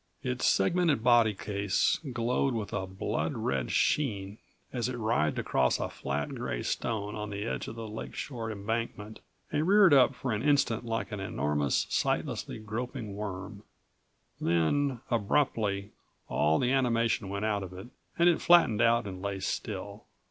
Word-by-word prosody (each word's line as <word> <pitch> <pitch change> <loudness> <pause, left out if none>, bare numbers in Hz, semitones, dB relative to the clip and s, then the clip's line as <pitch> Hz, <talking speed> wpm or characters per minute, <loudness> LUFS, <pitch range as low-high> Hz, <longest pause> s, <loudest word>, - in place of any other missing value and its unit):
Its 65 - 0
segmented 150 - +2
body 120 -3 +5
case 100 -1 0
glowed 120 +2 0
with 105 -3 -4
a 95 -2 -2
blood 95 0 -2
red 65 -2 -1
sheen 105 -8 0 0.3
as 125 -1 -1
it 125 - -4
writhed 110 - +1
across 65 -1 +1
a - - -2
flat 70 +1 -3
gray - - -3
stone 105 -3 -2
on 105 0 -5
the 100 0 -4
edge 115 - -3
of - - -7
the 115 -1 -6
lakeshore 115 +2 -5
embankment, 110 0 -4 0.3
and 155 +3 0
reared 195 -4 +6
up 135 -1 +5
for 125 0 -3
an 105 0 -1
instant 140 -6 +2
like 115 0 -3
an 105 - -4
enormous, 75 -7 0
sightlessly - - -1
groping 110 +1 -5
worm. 100 0 -6 0.8
Then, 115 - +1
abruptly, 105 -3 0 0.4
all 75 +1 +2
the 125 - +1
animation 115 -6 +1
went 100 +2 -2
out 105 -2 0
of 95 -2 -7
it, 95 +6 -9 0.3
and 170 - +5
it 175 - +3
flattened 165 -11 +5
out 115 0 +4
and 95 -2 -6
lay 100 -1 -3
still. - - -4
110 Hz, 155 wpm, -29 LUFS, 100-120 Hz, 0.8 s, reared